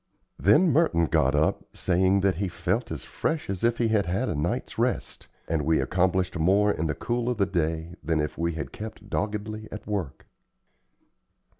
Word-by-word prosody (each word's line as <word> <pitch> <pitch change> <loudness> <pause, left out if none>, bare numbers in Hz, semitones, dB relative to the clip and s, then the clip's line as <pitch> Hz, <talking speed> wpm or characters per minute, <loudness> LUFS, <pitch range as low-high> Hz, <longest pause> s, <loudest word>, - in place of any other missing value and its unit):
Then 155 - +5
Merton 110 - +3
got 75 -3 +2
up, 75 +2 +1
saying 95 +2 +2
that 95 -3 +2
he 100 +1 -1
felt 90 - -2
as - - -5
"fresh 160 -10 -2
as 95 - -5
if 120 0 +2
he 115 -2 +1
had 105 -4 +2
had 95 +9 0
a - - -1
night's 75 +4 -2
rest," - - -1 0.2
and 80 -1 0
we 80 +2 +2
accomplished 90 0 +1
more 100 +5 +4
in 80 -4 -1
the 75 - -1
cool 120 - -1
of 125 - -1
the 100 - +3
day 80 -2 -2
than 80 -1 +1
if 75 0 -2
we 85 0 -1
had 80 - -5
kept 110 +1 -9
doggedly 110 +1 -3
at 105 - -7
work. 95 -10 -4
95 Hz, 185 wpm, -26 LUFS, 80-105 Hz, 0.2 s, Then